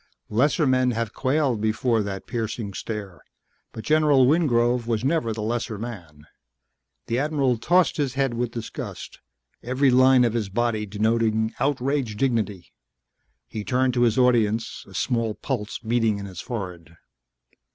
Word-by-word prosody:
Lesser 145 +8 +2
men 130 -1 +3
have 115 -3 -2
quailed 130 -4 0
before 115 +1 +1
that 100 -2 -5
piercing 110 -3 -4
stare, 100 -4 -6 0.5
but 110 - -8
General 150 -1 +4
Wingrove 125 -5 +2
was 115 -1 -1
never 135 -5 +1
the 110 -1 -4
lesser 115 0 -2
man. 90 -10 -8 0.8
The 120 - -1
admiral 140 -5 +1
tossed 175 +8 +3
his 140 -4 -1
head 135 -3 +1
with 120 0 -1
disgust, 115 -1 -7 0.4
every 130 +2 +2
line 130 0 +6
of 115 -2 +1
his 110 -4 -2
body 110 0 -1
denoting 110 +1 +1
outraged 135 -3 -1
dignity. 105 -8 -1 0.7
He 110 -2 -6
turned 130 +2 +1
to 120 - +1
his 115 -1 +3
audience, 115 -3 +1
a 95 - -13
small 115 +1 0
pulse 110 -6 -4
beating 115 -2 0
in 100 - -6
his 95 -3 -8
forehead. 90 -8 -7
115 Hz, 145 wpm, -24 LUFS, 110-130 Hz, 0.8 s, line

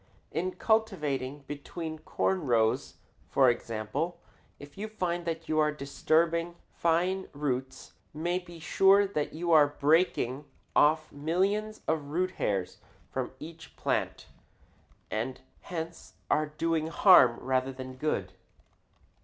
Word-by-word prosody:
In 180 +3 -2
cultivating 145 - 0
between 155 +2 -6
corn 185 +4 -1
rows, 115 -2 +1 0.3
for 130 -3 +5
example, 115 +10 -3 0.4
if 145 0 -13
you 210 +2 -4
find 175 -5 -2
that 165 -1 -4
you 155 0 +1
are 150 0 +3
disturbing 165 +4 0 0.2
fine 180 +3 +1
roots, 130 -2 -3 0.2
you 150 - -9
may 175 +2 +1
be 175 -2 -12
sure 195 +5 +5
that 155 -7 -2
you 170 +2 -2
are 150 -3 +7
breaking 145 -3 +2 0.3
off 155 +1 +4
millions 195 +8 -1
of 160 -2 0
root 180 +6 -1
hairs 95 -3 -1 0.3
from - - -3
each 160 +1 -11
plant - - -1 0.9
and 120 +5 -3 0.2
hence 165 -1 -7 0.2
are 155 0 +2
doing 160 +1 -1
harm 165 - +6
rather 130 +1 0
than 130 0 -8
good. 150 +4 -2
155 Hz, 125 wpm, -29 LUFS, 140-175 Hz, 0.9 s, are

